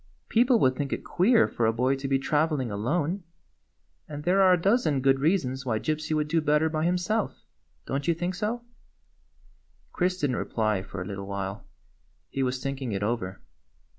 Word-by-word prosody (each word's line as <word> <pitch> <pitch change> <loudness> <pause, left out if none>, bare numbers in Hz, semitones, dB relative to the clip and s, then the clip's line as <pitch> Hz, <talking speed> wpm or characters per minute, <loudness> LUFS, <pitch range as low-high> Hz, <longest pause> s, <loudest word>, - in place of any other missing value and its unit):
Peo 235 +2 +4
ple 250 -1 +4
would 130 -6 +3
think 140 +1 -3
it - - -3
queer 225 +6 +3
for 115 - 0
a - - +4
boy 125 +4 +1
to 135 0 -4
be 135 0 +2
travel 150 +2 +1
ing 125 -4 -3
alone; 150 - -1 0.9
and 150 -1 -6
there 185 +4 +3
are 185 -1 +6
a 180 - +2
dozen 180 - +2
good 135 0 +3
reasons 135 -5 +1
why 120 -4 0
Gypsy 155 +5 -2
would 150 0 0
do 165 +1 +1
better 150 +1 +2
by 155 0 -1
himself. 180 +5 -1 0.4
Don't 140 +3 -3
you 170 - +3
think 175 +2 -2
so?" 220 +6 -3 1.3
Chris 180 0 0
did 145 -6 +1
n't 125 - -1
reply 110 -4 0
for 95 -2 -6
a - - -10
little 100 0 -6
while. 100 +1 -5 0.6
He 135 - -2
was 130 0 -1
thinking 135 -4 -3
it 100 +1 -2
over. 105 -4 -2
145 Hz, 195 wpm, -27 LUFS, 125-175 Hz, 1.3 s, are